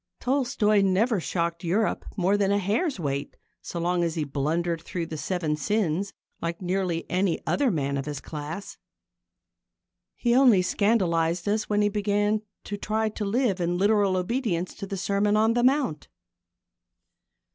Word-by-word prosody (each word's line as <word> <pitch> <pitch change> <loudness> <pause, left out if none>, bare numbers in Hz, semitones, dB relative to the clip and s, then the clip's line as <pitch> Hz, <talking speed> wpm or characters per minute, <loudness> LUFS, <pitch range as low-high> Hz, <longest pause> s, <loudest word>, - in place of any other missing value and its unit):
Tolstoi 245 -6 +2
never 195 +3 +2
shocked 170 0 -2
Europe 195 +6 0
more 190 +2 +2
than 200 -1 +2
a 200 - +3
hair's 210 - 0
weight 140 -3 -3 0.2
so 170 - -5
long 175 +1 +1
as 165 -2 -1
he 160 - 0
blundered 160 +4 -1
through 170 0 -4
the 160 - -6
seven 155 0 -1
sins 195 +3 0 0.3
like 170 0 -3
nearly 180 -2 -1
any 185 -1 0
other 285 -3 +2
man 140 -7 -1
of 135 +1 -4
his 145 -2 -4
class. 155 +7 -7 1.4
He 240 -1 +1
only 245 -8 +6
scandalised 180 -4 +1
us 210 +1 0
when 210 0 +2
he 205 - +3
began 205 +1 +1 0.2
to 205 - -5
try 220 +2 -1
to 215 0 -5
live 205 -3 +1
in 175 +1 0
literal 200 -1 +3
obedience 185 -3 -1
to 200 - -7
the 195 - -4
Sermon 200 +2 +1
on 220 +1 +3
the 240 - +1
Mount. 260 - +1
195 Hz, 155 wpm, -26 LUFS, 170-215 Hz, 1.4 s, only